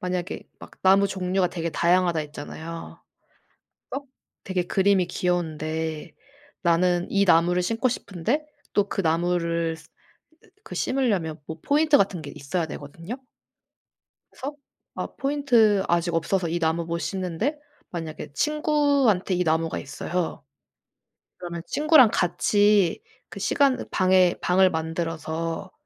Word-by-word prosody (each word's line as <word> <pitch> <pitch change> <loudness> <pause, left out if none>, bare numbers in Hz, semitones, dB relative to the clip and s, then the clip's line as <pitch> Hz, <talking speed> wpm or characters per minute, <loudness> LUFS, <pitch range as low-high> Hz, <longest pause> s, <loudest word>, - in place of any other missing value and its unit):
만약에 180 -1 -4
막 - - -12
나무 195 +1 +5
종류가 185 -1 0
되게 170 -2 -3
다양하다 175 +1 +2
했잖아요. 160 +2 -8 0.9
막 280 - -4 0.4
되게 185 -2 -1
그림이 190 0 +2
귀여운데 160 -3 -2 0.5
나는 175 0 +2
이 200 0 +3
나무를 175 0 +4
심고 230 +7 0
싶은데 230 - -2 0.3
또 205 -1 +2
그 - - -1
나무를 170 -1 0
스 160 - -18
으 - - -51 0.7
그 - - -8
심으려면 200 - 0
보 160 0 -7
포인트 300 - +4
같은 195 -3 +1
게 145 -1 -8
있어야 160 +5 -2
되거든요? 165 +8 -7 1.2
그래서 280 +3 -6 0.4
아 - - -3
포인트 245 -8 +3
아직 170 0 +1
없어서 170 +2 0
이 170 +2 -1
나무 165 0 0
못 170 0 -2
심는데 190 - -2 0.3
만약에 160 -3 -6
친구한테 285 - +2
이 180 - +1
나무가 160 0 0
있어요. 160 +5 -4 0.9
그러면 170 -1 -6
친구랑 300 -6 +5
같이 200 +2 +2 0.3
그 - - -9
시간 275 -3 +2
방에 185 -1 +4
방을 185 +1 +4
만들어서 165 +2 -3
180 Hz, 275 characters per minute, -25 LUFS, 165-200 Hz, 1.2 s, 나무